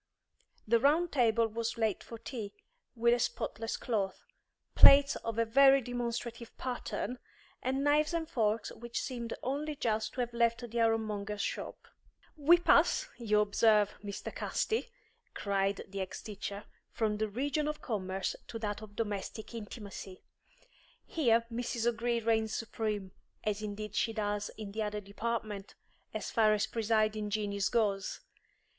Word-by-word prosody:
The 230 Hz, +2 st, +4 dB
round 310 Hz, +7 st, +3 dB
table 230 Hz, -4 st, +3 dB
was 230 Hz, +1 st, -3 dB
laid 220 Hz, -4 st, 0 dB
for 230 Hz, -, -9 dB
tea, 220 Hz, -3 st, -6 dB, 0.4 s
with 235 Hz, 0 st, +4 dB
a 240 Hz, -, +2 dB
spotless 225 Hz, -1 st, -2 dB
cloth, 200 Hz, -5 st, -2 dB, 0.5 s
plates 275 Hz, 0 st, +8 dB
of 230 Hz, -1 st, -4 dB
a 230 Hz, -, +3 dB
very 270 Hz, +4 st, +7 dB
demonstrative 235 Hz, -1 st, -4 dB
pattern, 250 Hz, 0 st, -3 dB, 0.4 s
and 265 Hz, +2 st, 0 dB
knives 295 Hz, +1 st, +3 dB
and 335 Hz, -1 st, -1 dB
forks 220 Hz, -4 st, 0 dB
which 235 Hz, 0 st, -5 dB
seemed 235 Hz, -3 st, -4 dB
only 290 Hz, +3 st, -2 dB
just 220 Hz, -4 st, -1 dB
to 250 Hz, -, -1 dB
have 240 Hz, -1 st, -3 dB
left 235 Hz, +1 st, +1 dB
the 235 Hz, +1 st, -1 dB
ironmonger's 215 Hz, -2 st, 0 dB
shop. -, -, -5 dB, 0.5 s
"We 315 Hz, +3 st, +6 dB
pass, -, -, +4 dB
you 210 Hz, -3 st, +3 dB
observe, 210 Hz, 0 st, +4 dB
Mr. 200 Hz, -1 st, -5 dB
Casti," 455 Hz, +2 st, -1 dB, 0.5 s
cried 195 Hz, -1 st, 0 dB
the 195 Hz, 0 st, -4 dB
ex 190 Hz, -, -5 dB
teacher, 205 Hz, -1 st, -5 dB, 0.3 s
"from 215 Hz, -2 st, 0 dB
the 215 Hz, 0 st, -1 dB
region 285 Hz, +7 st, -1 dB
of 300 Hz, 0 st, -4 dB
commerce 190 Hz, -4 st, -2 dB
to 230 Hz, -, -5 dB
that 210 Hz, -1 st, -3 dB
of 210 Hz, -1 st, -11 dB
domestic 210 Hz, +1 st, -4 dB
intimacy. 205 Hz, -4 st, -8 dB, 0.8 s
Here 235 Hz, -7 st, +2 dB
Mrs. 235 Hz, -1 st, -2 dB
O'Gree 235 Hz, 0 st, +1 dB
reigns 220 Hz, -1 st, +1 dB
supreme, 210 Hz, -3 st, -3 dB, 0.3 s
as 210 Hz, 0 st, -1 dB
indeed 210 Hz, 0 st, -5 dB
she 225 Hz, +2 st, +1 dB
does 205 Hz, -1 st, -1 dB
in 210 Hz, -2 st, -6 dB
the 220 Hz, +2 st, -3 dB
other 210 Hz, 0 st, -2 dB
department, 210 Hz, 0 st, -4 dB, 0.4 s
as -, -, -4 dB
far 215 Hz, -2 st, +4 dB
as 205 Hz, -, +1 dB
presiding 215 Hz, -1 st, +1 dB
genius 205 Hz, -1 st, 0 dB
goes. 200 Hz, -4 st, 0 dB
225 Hz, 145 wpm, -32 LUFS, 210-240 Hz, 0.8 s, plates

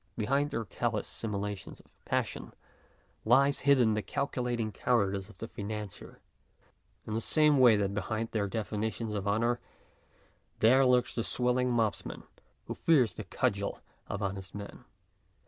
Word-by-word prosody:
Behind 140 Hz, +6 st, +1 dB
their 115 Hz, -4 st, -3 dB
callous 110 Hz, 0 st, -2 dB
simulations 105 Hz, -2 st, -4 dB
of -, -, -19 dB, 0.2 s
passion -, -, -2 dB, 0.7 s
lies 140 Hz, +5 st, +4 dB
hidden 130 Hz, -6 st, +4 dB
the 105 Hz, -, 0 dB
calculating 120 Hz, -4 st, -2 dB
cowardice 100 Hz, -4 st, 0 dB
of -, -, -16 dB
the 115 Hz, -, -6 dB
financier 105 Hz, -2 st, -7 dB, 0.8 s
in 110 Hz, -, -5 dB
the 110 Hz, -, 0 dB
same 150 Hz, +2 st, +4 dB
way 120 Hz, -4 st, +7 dB
that 100 Hz, -1 st, 0 dB
behind 110 Hz, +3 st, -2 dB
their 105 Hz, -3 st, 0 dB
definitions 110 Hz, +1 st, -3 dB
of 100 Hz, -1 st, -3 dB
honour 115 Hz, +4 st, +1 dB, 1.0 s
there 130 Hz, +4 st, +5 dB
lurks 125 Hz, -1 st, +3 dB
the 115 Hz, -, -1 dB
swell 125 Hz, +1 st, +1 dB
mobsman 115 Hz, -4 st, -1 dB, 0.4 s
who -, -, -4 dB
fears 135 Hz, -9 st, +3 dB
the -, -, -6 dB
cudgel 100 Hz, 0 st, -1 dB, 0.3 s
of 100 Hz, +1 st, -4 dB
honest 95 Hz, 0 st, -4 dB
men. 100 Hz, 0 st, -8 dB
110 Hz, 140 wpm, -30 LUFS, 105-125 Hz, 1.0 s, way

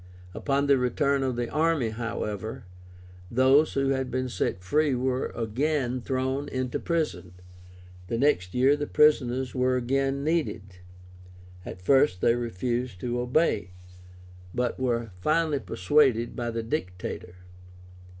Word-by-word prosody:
Upon 140 Hz, +5 st, 0 dB
the 140 Hz, -2 st, +4 dB
return 140 Hz, +3 st, +1 dB
of 130 Hz, -2 st, -1 dB
the 120 Hz, 0 st, -2 dB
army, 155 Hz, -4 st, +1 dB
however, 110 Hz, 0 st, -4 dB, 0.6 s
those 130 Hz, +5 st, +4 dB
who 135 Hz, 0 st, +1 dB
had 130 Hz, -1 st, 0 dB
been 130 Hz, +1 st, -2 dB
set 95 Hz, -6 st, -2 dB
free 145 Hz, +7 st, +2 dB
were 130 Hz, +1 st, -1 dB
again 130 Hz, +2 st, -1 dB
thrown 130 Hz, +3 st, -2 dB
into 130 Hz, -1 st, -2 dB
prison. 160 Hz, -, -2 dB, 0.7 s
The 115 Hz, -, -2 dB
next 105 Hz, -10 st, +1 dB
year 130 Hz, +3 st, +4 dB
the 145 Hz, 0 st, -4 dB
prisoners 130 Hz, -4 st, +3 dB
were 130 Hz, 0 st, +1 dB
again 135 Hz, +2 st, 0 dB
needed. 125 Hz, -, -2 dB, 0.9 s
At 90 Hz, -, -8 dB
first 135 Hz, -3 st, +4 dB
they 115 Hz, -, +3 dB
refused 120 Hz, -1 st, -3 dB
to 120 Hz, 0 st, -2 dB
obey, 125 Hz, -, +1 dB, 0.8 s
but 125 Hz, 0 st, -1 dB
were 120 Hz, -4 st, -1 dB
finally 155 Hz, -, +1 dB
persuaded 120 Hz, +2 st, +2 dB
by 120 Hz, -1 st, -3 dB
the 115 Hz, 0 st, -3 dB
Dictator. 90 Hz, -, -5 dB
130 Hz, 130 wpm, -27 LUFS, 115-140 Hz, 0.9 s, the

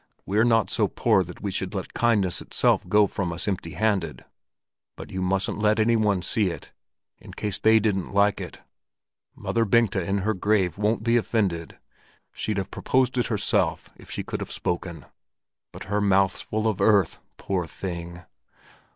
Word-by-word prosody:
We're 105 Hz, +3 st, +2 dB
not 115 Hz, -2 st, +3 dB
so -, -, +2 dB
poor 95 Hz, -, +2 dB
that 90 Hz, 0 st, -11 dB
we 100 Hz, -, -2 dB
should 95 Hz, +2 st, -3 dB
let 95 Hz, -, -5 dB
kindness 105 Hz, -7 st, +1 dB
itself -, -, +1 dB
go 105 Hz, 0 st, +5 dB
from 95 Hz, -3 st, -3 dB
us 85 Hz, +4 st, -3 dB
empty 90 Hz, -4 st, -3 dB
handed. 100 Hz, -8 st, -1 dB, 0.7 s
But -, -, -10 dB
you 95 Hz, -, -3 dB
mustn't 95 Hz, +2 st, 0 dB
let 105 Hz, +1 st, +3 dB
any 115 Hz, +2 st, +3 dB
one 105 Hz, -5 st, +1 dB
see 105 Hz, 0 st, +1 dB
it, 85 Hz, -, -8 dB, 0.5 s
in -, -, -13 dB
case 105 Hz, -2 st, -3 dB
they 110 Hz, 0 st, +5 dB
didn't 100 Hz, -3 st, -1 dB
like 100 Hz, 0 st, +2 dB
it. -, -, -8 dB, 0.7 s
Mother 115 Hz, -, 0 dB
Bengta 115 Hz, -3 st, +2 dB
in 95 Hz, +3 st, -1 dB
her 110 Hz, -, +2 dB
grave 95 Hz, -3 st, +1 dB
won't 105 Hz, +1 st, +1 dB
be 120 Hz, +1 st, +3 dB
offended; 100 Hz, -8 st, -1 dB, 0.6 s
she'd 110 Hz, -2 st, -2 dB
have 100 Hz, -1 st, -3 dB
proposed 130 Hz, -1 st, +1 dB
it 120 Hz, -, +1 dB
herself, 105 Hz, -3 st, 0 dB
if -, -, -16 dB
she -, -, -3 dB
could -, -, -5 dB
have -, -, -6 dB
spoken; 85 Hz, -4 st, -4 dB, 0.7 s
but -, -, -9 dB
her 105 Hz, +1 st, -1 dB
mouth's 95 Hz, -2 st, +2 dB
full 110 Hz, +1 st, -2 dB
of 110 Hz, -4 st, -1 dB
earth, 100 Hz, -6 st, +3 dB, 0.2 s
poor 90 Hz, -3 st, -2 dB
thing!" 85 Hz, 0 st, -6 dB
100 Hz, 175 wpm, -25 LUFS, 90-110 Hz, 0.7 s, go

